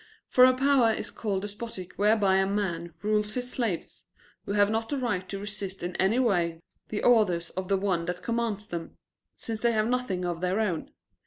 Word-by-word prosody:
For 255 - +6
a 255 0 +4
power 265 -4 +4
is - - -3
called 200 -3 -2
despotic 205 -3 -7
whereby 205 -2 +3
a 190 0 +2
man 175 -5 -2
rules 210 0 +1
his 250 0 -2
slaves, 225 -9 -3 0.4
who 200 - -1
have 205 0 +4
not 225 0 -1
the 285 - -1
right 190 -8 -2
to 195 - -4
resist 195 -2 -5
in 175 0 -4
any 195 +5 +2
way 175 -10 +1 0.3
the 210 - -3
orders 195 -8 +3
of 185 0 -4
the 195 0 +2
one 185 -4 0
that 180 +1 -4
commands 230 -3 -1
them, 170 -3 -6 0.4
since 225 -1 -5
they 235 -1 +3
have 215 0 +2
nothing 240 -8 -1
of 175 -1 -3
their 185 +3 0
own. 185 -7 -1
205 Hz, 195 wpm, -28 LUFS, 185-225 Hz, 0.4 s, For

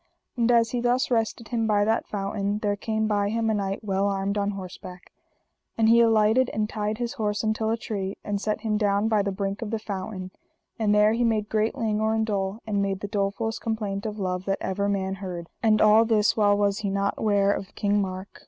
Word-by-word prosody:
And 240 -1 +2
as 230 -1 +3
he 245 - -1
thus 245 +2 +1
rested 225 -1 -1
him 230 -2 0
by 205 -1 +3
that 220 +1 0
fountain 200 0 -2
there 205 -1 -1
came 220 +1 -1
by 205 -1 +1
him 225 0 0
a - - +1
knight 195 0 -2
well 195 -1 0
armed 195 0 -1
on 205 -1 0
horseback; 185 -2 -8 0.7
and 225 -1 +3
he 230 +1 +6
alighted, 225 +2 +4
and 215 0 0
tied 210 0 -3
his 240 +1 -3
horse 210 -5 -2
until 220 0 0
a 225 - +1
tree, 200 -4 -4
and 205 -1 -2
set 215 0 -2
him 215 -2 0
down 205 0 +1
by 215 -2 +2
the 200 0 -1
brink 195 +1 -3
of 225 - -4
the 225 - -1
fountain; 190 -2 -6 0.5
and 210 -2 +2
there 210 +1 +5
he 240 +1 +1
made 215 -2 +1
great 220 0 0
languor 220 0 0
and 220 0 +1
dole, 200 0 -2
and 205 -2 0
made 195 -1 -2
the 205 - -3
dolefullest 205 +2 -2
complaint 215 -2 -3
of 210 0 -5
love 185 -2 -2
that 195 0 0
ever 200 +1 -1
man 190 -1 -1
heard; 180 -3 -6
and 215 -2 +4
all 215 +1 +6
this 220 -2 +2
while 205 -2 +3
was 205 0 +1
he 205 - -2
not 200 +1 -1
ware 200 -2 +3
of 195 - -7
King 205 0 +1
Mark. 190 0 -6
210 Hz, 225 wpm, -25 LUFS, 200-220 Hz, 0.7 s, he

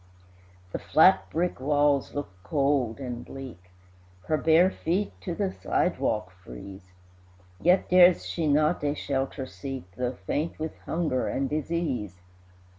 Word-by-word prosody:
The - - -3
flat 185 +5 +4
brick 175 -1 -1
walls 145 0 +1
look 145 -1 -3
cold 140 -5 0
and 125 -3 -5
bleak, 125 -10 -10 0.6
Her 155 - +1
bare 165 +5 +4
feet 185 +5 -1
to 175 -3 -4
the 195 -1 -1
sidewalk 115 - -1
freeze; 90 +8 -11 0.7
Yet 180 +3 +3
dares 180 -1 +6
she 165 -3 -2
not 150 +2 +2
a 145 0 0
shelter 135 -1 -2
seek, 130 +5 -7
Though 125 +1 -3
faint 155 - -2
with 155 0 -4
hunger 160 -7 0
and 135 0 -1
disease. 145 - -2
145 Hz, 130 wpm, -27 LUFS, 125-165 Hz, 0.7 s, dares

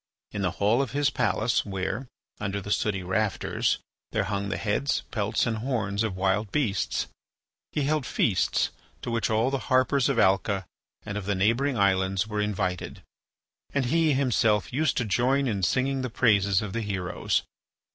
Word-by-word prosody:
In 100 - -4
the 95 - +1
hall 110 +6 +3
of 135 -2 -3
his 145 0 +2
palace 120 -3 +1
where, 100 +6 -3 0.3
under 100 -1 -2
the 100 +1 -6
sooty 100 -3 0
rafters, 100 +3 0 0.3
there - - +1
hung 100 -1 -2
the - - -2
heads, 110 +6 0
pelts, 105 -1 0
and 115 -1 -1
horns 110 -5 -1
of 110 -4 -1
wild 95 +2 0
beasts, 115 -10 0 0.7
he 150 - -1
held 150 -2 0
feasts 100 -6 +1 0.3
to 120 - -3
which 115 -1 0
all 110 +4 +2
the 135 - 0
harpers 130 +1 +3
of 135 - 0
Alca 95 -1 +2 0.4
and 105 -1 -4
of 100 - -8
the 100 - +1
neighbouring 115 +8 +2
islands 95 -1 +2
were 105 -1 -2
invited, 90 -4 -2 0.7
and 140 -2 +2
he 165 -3 +4
himself 115 -6 +2
used 145 +1 +1
to 125 - +1
join 130 +6 +2
in 100 -5 -1
singing 130 +7 +1
the 130 - -2
praises 100 -4 +3
of 100 -3 -5
the 115 - -1
heroes. 95 -4 -1
110 Hz, 170 wpm, -27 LUFS, 100-130 Hz, 0.7 s, he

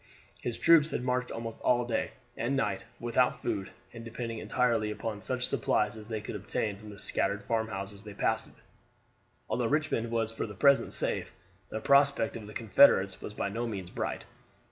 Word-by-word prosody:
His 120 - -3
troops 165 -2 +6
had 130 - -2
marched 125 0 0
almost 115 -1 -5 0.3
day 120 - 0 0.3
and 130 +4 -1
night, 135 - -1
without 120 +1 +2
food, 100 -5 -2 0.2
and 115 -1 -8
depending 115 0 -5
entirely 115 -4 +1
upon 105 0 -4
such 125 +3 -2
supplies 105 +1 +1
as 110 -1 -10
they 110 -2 -3
could 105 - -6
obtain 105 0 -2
from 105 +1 -11
the 100 - -10
scattered 100 0 -1
farmhouses 105 -3 -2
they 105 -1 -10
passed. - - 0 1.0
Although 120 -2 0
Richmond 145 -5 0
was 115 -1 0
for 115 - -3
the 105 - -9
present 140 +8 +4
safe, - - 0 0.3
the 110 - -3
prospect 140 -2 +4
of 110 -3 -7
the 105 - -10
Confederates 100 -3 +5
was 105 - -7
by 100 - -1
no 115 +4 -2
means 95 -5 -5
bright. - - -3
115 Hz, 175 wpm, -30 LUFS, 105-125 Hz, 1.0 s, troops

